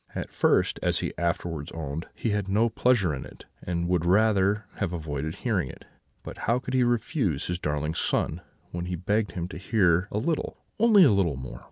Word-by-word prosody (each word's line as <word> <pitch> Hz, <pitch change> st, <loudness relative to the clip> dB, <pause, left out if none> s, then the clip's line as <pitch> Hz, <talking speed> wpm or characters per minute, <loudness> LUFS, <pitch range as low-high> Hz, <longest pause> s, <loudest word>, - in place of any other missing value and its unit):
At -, -, -4 dB
first, -, -, +2 dB
as -, -, +1 dB
he -, -, -3 dB
afterwards 85 Hz, -2 st, -2 dB
owned, 80 Hz, +1 st, -5 dB
he 115 Hz, -, -1 dB
had 105 Hz, -2 st, -1 dB
no 110 Hz, +4 st, +3 dB
pleasure 110 Hz, -7 st, +2 dB
in 65 Hz, -, -5 dB
it, -, -, -13 dB, 0.2 s
and 85 Hz, -1 st, -2 dB
would 90 Hz, -2 st, +1 dB
rather 100 Hz, +2 st, +3 dB
have 85 Hz, -, -2 dB
avoided 80 Hz, -1 st, -4 dB
hearing 100 Hz, -, -1 dB
it; -, -, -12 dB, 0.4 s
but -, -, -8 dB
how 120 Hz, -, +4 dB
could 125 Hz, 0 st, -5 dB
he 130 Hz, -, +3 dB
refuse 120 Hz, -, 0 dB
his 90 Hz, 0 st, -2 dB
darling 75 Hz, -1 st, -1 dB
son, -, -, 0 dB, 0.3 s
when 85 Hz, 0 st, -4 dB
he 90 Hz, 0 st, -3 dB
begged 100 Hz, +4 st, 0 dB
him 85 Hz, -1 st, -3 dB
to 80 Hz, -, -7 dB
hear 90 Hz, -3 st, +2 dB
a -, -, -3 dB
little 155 Hz, +8 st, -1 dB, 0.2 s
only 215 Hz, -3 st, +7 dB
a 140 Hz, -, +6 dB
little 95 Hz, -7 st, +2 dB
more? 65 Hz, -1 st, -7 dB
90 Hz, 200 wpm, -27 LUFS, 80-110 Hz, 0.4 s, only